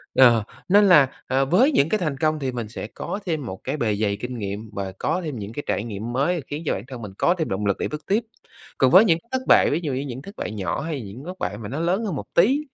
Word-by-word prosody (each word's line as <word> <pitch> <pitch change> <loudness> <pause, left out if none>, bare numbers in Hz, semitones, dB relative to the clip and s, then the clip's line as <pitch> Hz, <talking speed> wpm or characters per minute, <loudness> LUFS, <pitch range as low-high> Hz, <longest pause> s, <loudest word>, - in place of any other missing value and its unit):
Ờ, 120 -4 +6 0.3
nên 205 +1 +6
là, 145 -7 +5
ờ, 135 +1 +2
với 235 - +4
những 150 - +3
cái 215 - +1
thành 150 -6 -2
công 155 0 +1
thì 135 -2 -2
mình 120 -3 -4
sẽ 110 - -6
có 200 - -5
thêm 155 -7 -2
một 95 -4 -6
cái - - -2
bề 110 -6 0
dày 100 -1 0
kinh 125 +2 -5
nghiệm 105 +1 -5
và 95 -1 -4
có 180 - 0
thêm 145 -7 -4
những 105 +2 -7
cái 145 - -5
trải 105 - 0
nghiệm 115 +1 -5
mới 155 +6 +1
khiến 150 +3 -5
cho - - +1
bản 95 - -4
thân 130 -3 -8
mình 105 -3 -7
có 175 - +3
thêm 160 - -2
động 100 +2 -2
lực 100 -1 +1
để - - -1
bước 150 0 -7
tiếp. 215 +4 +2 0.5
Còn 130 -1 +4
với 200 +5 +8
những 165 -3 +3
cái 235 - -36
thất 260 0 0
bại, - - +6
ví 155 - +1
dụ 145 -4 -1
như 130 - -1
những 135 -2 -6
thất 200 +7 -11
bại - - -4
nhỏ, 100 +3 -2
hay 155 -3 -3
những 110 +6 -9
thất 185 +1 -7
bại 105 - -3
mà 110 -1 -7
nó 140 +5 -4
lớn 185 +7 0
hơn 190 - -2
một - - -5
tí, 250 +12 +5
135 Hz, 295 wpm, -23 LUFS, 110-170 Hz, 0.5 s, với